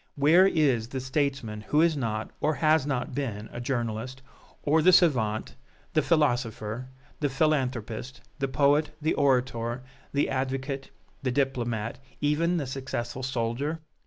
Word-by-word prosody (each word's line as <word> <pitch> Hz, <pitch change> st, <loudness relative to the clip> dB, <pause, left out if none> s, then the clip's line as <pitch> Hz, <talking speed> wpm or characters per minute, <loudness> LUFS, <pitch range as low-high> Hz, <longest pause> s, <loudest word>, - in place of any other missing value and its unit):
Where 160 Hz, +7 st, +6 dB
is 135 Hz, -11 st, +2 dB
the 130 Hz, +2 st, -4 dB
statesman 130 Hz, -5 st, -2 dB
who 150 Hz, +8 st, +1 dB
is 170 Hz, -2 st, +3 dB
not, 110 Hz, -5 st, -2 dB
or 155 Hz, +1 st, +1 dB
has 155 Hz, -2 st, +3 dB
not 135 Hz, -2 st, -2 dB
been, 115 Hz, -6 st, -3 dB
a 120 Hz, -, -5 dB
journalist, 120 Hz, 0 st, -3 dB, 0.4 s
or 155 Hz, +2 st, +3 dB
the 185 Hz, -, +6 dB
savant, 120 Hz, -, +3 dB, 0.4 s
the -, -, +4 dB
philosopher, 120 Hz, -6 st, 0 dB, 0.3 s
the 145 Hz, -, +1 dB
philanthropist, 130 Hz, -5 st, -1 dB, 0.2 s
the 135 Hz, -, 0 dB
poet, 145 Hz, +3 st, +3 dB
the 155 Hz, +1 st, +1 dB
orator, 125 Hz, -3 st, +1 dB, 0.3 s
the 140 Hz, -, +1 dB
advocate, 135 Hz, +1 st, -2 dB, 0.3 s
the 135 Hz, -, -1 dB
diplomat, 120 Hz, -4 st, -1 dB, 0.2 s
even 165 Hz, +4 st, +1 dB
the 150 Hz, -, -1 dB
successful 130 Hz, -2 st, -4 dB
soldier? 130 Hz, +5 st, -2 dB
130 Hz, 135 wpm, -27 LUFS, 120-145 Hz, 0.4 s, Where